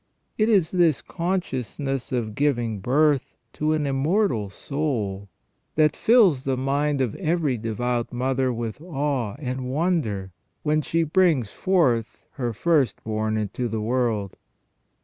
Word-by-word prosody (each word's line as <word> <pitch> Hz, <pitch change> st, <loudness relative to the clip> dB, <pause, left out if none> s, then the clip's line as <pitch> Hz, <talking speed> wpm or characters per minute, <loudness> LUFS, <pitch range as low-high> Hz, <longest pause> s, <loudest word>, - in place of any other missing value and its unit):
It 215 Hz, +1 st, +2 dB
is 190 Hz, -7 st, +3 dB
this 170 Hz, -6 st, +3 dB
consciousness 140 Hz, -, -3 dB
of 115 Hz, -4 st, -2 dB
giving 120 Hz, -5 st, 0 dB
birth 140 Hz, +6 st, +2 dB, 0.2 s
to 155 Hz, +1 st, 0 dB
an 155 Hz, -1 st, 0 dB
immortal 135 Hz, -, +1 dB
soul 105 Hz, -, -3 dB, 0.5 s
that 150 Hz, -1 st, +3 dB
fills 200 Hz, -, +4 dB
the 135 Hz, -2 st, 0 dB
mind 140 Hz, +2 st, 0 dB
of 120 Hz, -5 st, 0 dB
every 155 Hz, -4 st, 0 dB
devout 120 Hz, +2 st, -2 dB
mother 130 Hz, +1 st, 0 dB
with 115 Hz, +2 st, -4 dB
awe 140 Hz, -, -2 dB
and 130 Hz, -2 st, -4 dB
wonder 130 Hz, -, -1 dB, 0.3 s
when 155 Hz, 0 st, +2 dB
she 165 Hz, +2 st, 0 dB
brings 160 Hz, -, +2 dB
forth 140 Hz, -, +1 dB
her 120 Hz, -4 st, -3 dB
first 145 Hz, +3 st, +1 dB
born 110 Hz, 0 st, -1 dB
into 110 Hz, +3 st, -2 dB
the 110 Hz, -1 st, -3 dB
world. 110 Hz, -3 st, -1 dB
135 Hz, 130 wpm, -24 LUFS, 115-155 Hz, 0.5 s, fills